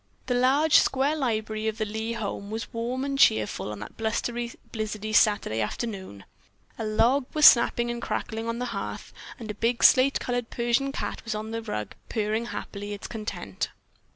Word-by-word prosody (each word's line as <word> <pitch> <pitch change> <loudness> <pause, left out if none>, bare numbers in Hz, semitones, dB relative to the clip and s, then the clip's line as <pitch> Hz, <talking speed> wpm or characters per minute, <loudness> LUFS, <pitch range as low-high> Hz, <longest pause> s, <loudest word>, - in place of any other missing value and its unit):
The 250 - 0
large, 270 +5 +5
square 275 +3 +1
library 220 -5 -1
of 220 0 -2
the 215 - -1
Lee 220 +2 -3
home 200 -2 -4
was 220 +2 -5
warm 245 +3 -2
and 275 -1 -2
cheerful 105 - +3
on 105 - -6
that 105 - -9
blustery, 235 +2 -2 0.2
blizzardy 215 -1 -4
Saturday 205 - +3
afternoon. 190 - -5 0.5
A - - -2
log 245 +5 +2
was 305 -1 +5
snapping 240 0 +6
and 240 0 -5
crackling 225 0 -3
on 230 0 -2
the 250 - -2
hearth - - -5 0.2
and 220 -3 -6
a - - -6
big 230 +3 0
slate 265 +2 +6
colored 245 -2 -2
Persian 240 +3 0
cat - - -4
on 215 +1 -5
the 230 0 -3
rug 105 - -4
was - - -16
purring 220 +1 -1
loudly 205 -3 -6
its 205 - -8
content. 220 -1 -4
225 Hz, 180 wpm, -26 LUFS, 215-245 Hz, 0.5 s, snapping